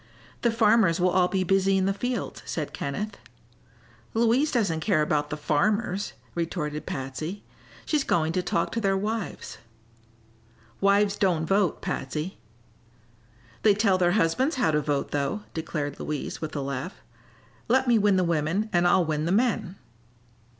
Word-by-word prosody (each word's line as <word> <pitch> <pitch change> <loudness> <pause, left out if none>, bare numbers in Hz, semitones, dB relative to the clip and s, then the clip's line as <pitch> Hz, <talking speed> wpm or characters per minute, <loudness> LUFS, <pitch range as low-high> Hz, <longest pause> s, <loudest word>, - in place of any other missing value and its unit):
"The 240 - +3
farmers 220 -6 +3
will 180 +1 +3
all 180 -1 +3
be 190 0 0
busy 195 +1 +2
in 190 - +1
the 195 - +1
fields," 245 +4 -3
said 155 -3 -4
Kenneth. 210 +10 -4 1.0
"Louise 235 +6 +3
doesn't 200 -11 +1
care 160 -4 +2
about 150 -1 0
the 150 - -4
farmers," 195 +6 0 0.2
retorted 155 -3 -3
Patsy. 145 +9 -5 0.4
"She's 300 -3 +1
going 160 -7 +1
to 185 - +1
talk 170 -1 -1
to 230 - -2
their 195 -2 +2
wives." 215 +1 -4 1.2
"Wives 200 +1 +3
don't 175 -5 +1
vote, 195 0 +1
Patsy." 150 +7 -4 1.2
"They 210 -2 +5
tell 200 -3 +2
their 175 -1 +3
husbands 220 - +2
how 250 -11 +2
to 150 0 +1
vote, 145 -1 -1
though," 145 +9 -1
declared 155 -3 -4
Louise, 150 -1 -4
with 155 -1 -5
a 145 - -1
laugh. 140 +6 -5 0.6
"Let 260 +2 +3
me 235 -2 +5
win 205 -1 +3
the 185 - +3
women 170 +6 0
and 175 0 +4
I'll 175 0 +4
win 155 -1 -1
the 170 - 0
men." 215 -3 +1
185 Hz, 155 wpm, -26 LUFS, 155-210 Hz, 1.2 s, They